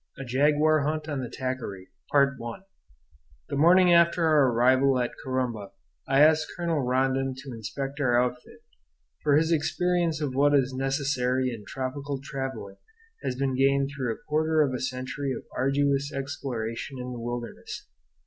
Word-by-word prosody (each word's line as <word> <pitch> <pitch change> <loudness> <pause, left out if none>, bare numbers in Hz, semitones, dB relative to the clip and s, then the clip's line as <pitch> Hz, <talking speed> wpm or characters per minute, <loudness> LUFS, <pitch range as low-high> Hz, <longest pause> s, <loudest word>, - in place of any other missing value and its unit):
III. 135 - -6
A - - -10
JAGUAR 150 +4 +3
HUNT 155 +2 -2
ON 145 -3 -3
THE 125 -2 -4
TAQUARY 120 -8 -5 1.6
The 145 - -3
morning 175 +4 +6
after 170 0 +4
our 150 -4 +4
arrival 130 +3 +3
at 120 -1 -1
Corumba 125 -6 -3 0.3
I 135 +1 +4
asked 155 0 +5
Colonel 170 -4 0
Rondon 130 +1 0
to 135 0 -9
inspect 135 +6 -5
our 120 -4 +3
outfit; 125 0 -3 0.6
for 145 -2 +3
his 160 +2 +2
experience 170 +1 +1
of 145 -4 -2
what 145 +2 +3
is 135 -1 +2
necessary 130 -1 0
in 105 -3 -9
tropical 135 +1 -4
travelling 135 -7 -6 0.4
has 125 - -2
been 135 0 -1
gained 135 +1 +2
through 130 -4 -2
a - - -22
quarter 155 +1 +2
of 135 -3 -1
a 125 - -2
century 130 +2 -3
of - - -6
arduous 140 +1 +1
exploration 135 -2 -4
in 125 0 -5
the 120 - -6
wilderness. 120 0 -6
135 Hz, 155 wpm, -27 LUFS, 130-150 Hz, 1.6 s, morning